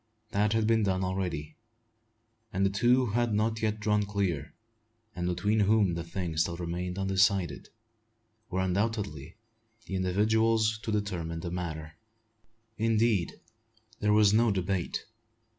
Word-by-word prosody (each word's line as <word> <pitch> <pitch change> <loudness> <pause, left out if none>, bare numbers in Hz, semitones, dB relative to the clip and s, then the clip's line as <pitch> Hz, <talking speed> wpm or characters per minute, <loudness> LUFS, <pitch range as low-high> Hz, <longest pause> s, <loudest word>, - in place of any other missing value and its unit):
That 105 +1 +2
had 110 -1 +2
been 110 0 +3
done 95 -2 +1
already; 90 -5 -3 0.9
and 100 -2 +1
the 95 - +2
two 120 +5 +3
who 110 - -3
had 120 -1 +1
not 110 +1 0
yet 110 -1 0
drawn 105 0 +2
clear 100 -7 -2 0.6
and 90 0 -2
between 105 +5 +1
whom 105 -3 +3
the 85 0 -3
thing 85 -1 -4
still 85 +1 +1
remained 90 +1 -4
undecided 95 -3 +1 0.8
were 95 0 -1
undoubtedly 95 -5 -2 0.5
the - - -7
individuals 110 +4 +2
to 110 - -3
determine 90 -6 -2
the 85 - -5
matter. 80 -3 -5 0.8
Indeed, 110 -4 +1 0.6
there 105 -1 +2
was 105 -1 +5
no 115 +2 +4
debate. 95 -3 -1
100 Hz, 135 wpm, -29 LUFS, 90-110 Hz, 0.9 s, was